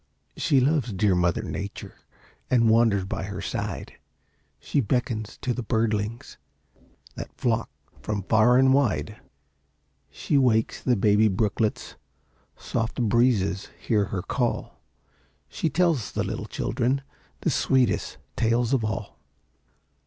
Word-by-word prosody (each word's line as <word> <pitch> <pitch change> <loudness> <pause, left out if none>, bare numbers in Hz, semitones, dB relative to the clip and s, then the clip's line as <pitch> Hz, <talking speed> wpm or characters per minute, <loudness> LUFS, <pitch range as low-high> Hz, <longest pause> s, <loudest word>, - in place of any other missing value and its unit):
She 145 -6 +2
loves 135 -2 +1
dear 100 +1 +2
Mother 90 -1 +1
Nature, 100 +1 -6 0.6
And 115 -3 +4
wanders 110 -4 +3
by 95 - -4
her 100 -1 -6
side; - - -5 0.6
She - - -1
beckons 115 -2 -2
to 125 - 0
the 125 - -4
birdlings 110 -1 -2 0.8
That - - -7
flock 115 -2 0 0.3
from 105 -2 -3
far 110 +5 +4
and 130 0 +5
wide. 135 -7 +1 0.9
She 140 - 0
wakes 110 -4 +2
the 125 - +2
baby 105 +1 +4
brooklets, 105 +2 -1 0.6
Soft 115 0 -3
breezes 110 -4 +2
hear 105 -3 +1
her 95 -2 -4
call; 120 +3 -2 0.7
She 160 - -2
tells 160 - +1
the - - 0
little - - -4
children 130 +3 -1 0.4
The - - +1
sweetest 130 -6 +1 0.2
tales 115 +2 +1
of 130 -4 +2
all. 105 -1 -4
115 Hz, 125 wpm, -25 LUFS, 105-125 Hz, 0.9 s, and